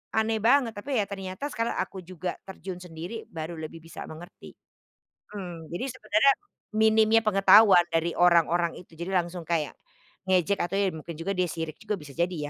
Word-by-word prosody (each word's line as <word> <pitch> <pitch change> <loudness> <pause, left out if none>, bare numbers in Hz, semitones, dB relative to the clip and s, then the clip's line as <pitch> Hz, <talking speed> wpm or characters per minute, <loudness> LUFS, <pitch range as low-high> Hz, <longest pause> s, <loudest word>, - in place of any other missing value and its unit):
Aneh 220 0 +1
banget, 240 +2 +4
tapi 265 +6 -3
ya - - +1
ternyata 195 +8 -5
sekarang 230 -2 -2
aku 190 - -3
juga 185 0 -5
terjun 190 -1 -7
sendiri 180 +5 -8
baru 160 +1 -6
lebih 160 +1 -7
bisa 165 - -9
mengerti. 175 +4 -12 0.8
Mmm, 175 -5 -7
jadi 175 +10 -3
sebenernya 215 +4 +4 0.4
minimnya 220 +1 +5
pengetahuan 195 -3 +7
dari 165 +1 +1
orang-orang 170 -1 +4
itu 170 -2 -14
jadi 190 +3 -3
langsung 170 -1 -8
kayak, 155 -4 -1 0.5
ngejek 185 +1 +2
atau 185 +3 -1
ya 195 -3 +1
mungkin 160 0 -8
juga 195 +4 -2
dia 180 -2 0
sirik 160 -1 -5
juga 210 -1 -2
bisa 150 -3 -11
jadi 175 +4 0
180 Hz, 170 wpm, -27 LUFS, 170-210 Hz, 0.8 s, pengetahuan